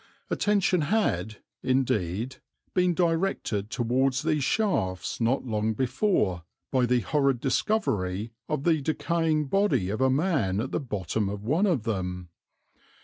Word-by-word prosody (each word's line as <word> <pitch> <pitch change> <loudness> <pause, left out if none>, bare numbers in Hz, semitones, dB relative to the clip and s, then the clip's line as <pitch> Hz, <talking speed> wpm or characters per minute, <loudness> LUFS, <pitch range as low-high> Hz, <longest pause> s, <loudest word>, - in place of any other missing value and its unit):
Attention 200 -4 +2
had, 110 - 0 0.2
indeed, 125 -2 0 0.4
been 180 -2 +2
directed 165 - 0
towards 130 +3 +1
these 155 -3 +1
shafts 120 - 0
not 120 +5 +1
long 110 -2 0
before 130 - +1 0.3
by 130 -2 +2
the 125 0 +2
horrid 140 -1 +1
discovery 110 - 0 0.2
of 135 - -1
the 160 -3 +2
decaying 160 +1 0
body 140 - +1
of 110 - -3
a 130 - +4
man 135 - +1
at 130 +4 -3
the - - 0
bottom 105 - -2
of 100 0 -5
one 160 - +2
of 160 - +1
them. 90 -5 -3
130 Hz, 135 wpm, -27 LUFS, 105-165 Hz, 0.4 s, a